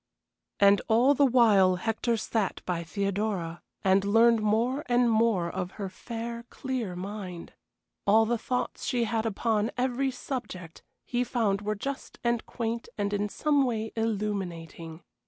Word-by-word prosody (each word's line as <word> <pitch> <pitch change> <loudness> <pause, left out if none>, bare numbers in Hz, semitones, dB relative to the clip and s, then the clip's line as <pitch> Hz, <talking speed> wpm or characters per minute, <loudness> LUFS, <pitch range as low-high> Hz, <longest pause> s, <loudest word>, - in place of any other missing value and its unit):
And 200 0 +6
all 240 +5 +5
the 280 0 +4
while 210 -7 +5
Hector 225 +5 -1
sat 215 -2 -2
by 175 -2 -2
Theodora, 195 -2 -2 0.2
and 190 0 +4
learned 225 +2 +4
more 230 +7 +1
and 245 -1 +3
more 220 -6 +2
of 180 +1 -4
her 200 -2 -5
fair, 235 +4 -6
clear 255 -9 -4
mind. 185 -2 -7 0.5
All 220 +2 +6
the 235 +1 0
thoughts 250 +2 -3
she 245 -2 0
had 225 0 0
upon 220 0 0
every 260 +2 0
subject 245 - -6 0.2
he 245 0 0
found 215 -5 0
were 210 +1 -2
just 275 +6 -6
and 235 -1 +1
quaint 230 0 -3
and 205 0 -1
in 205 0 0
some 290 +4 +2
way 225 -3 -2
illuminating. 185 -7 -3
220 Hz, 145 wpm, -28 LUFS, 195-235 Hz, 0.5 s, And